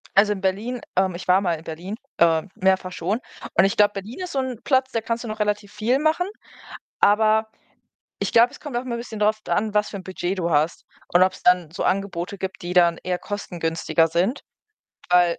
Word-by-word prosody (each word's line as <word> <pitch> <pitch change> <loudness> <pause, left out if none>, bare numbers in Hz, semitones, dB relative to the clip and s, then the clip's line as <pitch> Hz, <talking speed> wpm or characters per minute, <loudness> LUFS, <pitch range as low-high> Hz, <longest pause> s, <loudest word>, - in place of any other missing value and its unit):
Also, 205 +1 +5
in 195 - -8
Berlin, 215 +6 -1
ähm 185 -1 +2
ich 180 - -8
war 185 +2 +5
mal 175 -3 +1
in 160 - -11
Berlin 175 +6 -6 0.2
äh, 165 -1 +4
mehrfach 190 -1 +1
schon 190 +7 -2 0.4
und - - +6
ich 195 - 0
glaube, 205 0 +5
Berlin 210 - -7
ist 360 - -5
so 270 - 0
'n 255 -3 -3
Platz, 260 -1 +2
da 230 - -1
kannst 230 +1 -3
du - - -6
noch 215 0 -5
relativ 210 0 -1
viel 230 +6 +1
machen. 315 +4 +1 0.7
Aber 220 +1 +4 0.7
ich - - -1
glaube, 235 +1 +6
es - - -12
kommt 285 -5 -5
auch 245 - 0
immer 250 -2 -4
'n - - -5
bisschen 220 -3 -7
drauf 215 +1 +2
d - - -5
an, 215 0 0
was 210 0 +2
für 200 - -6
'n 185 - -8
Budget 185 0 -3
du 170 -1 -1
hast 155 +1 +1 0.3
und 180 - +7
ob's 185 0 +1
dann 180 -3 +3
so 170 - -4
Angebote 195 0 -1
gibt, 190 -1 -5
die 175 +1 -4
dann 170 -2 +4
eher 180 -1 -1
kostengünstiger 165 -5 -1
sind. 180 - 0 0.7
Weil 175 -1 +4
195 Hz, 220 wpm, -23 LUFS, 180-220 Hz, 0.7 s, und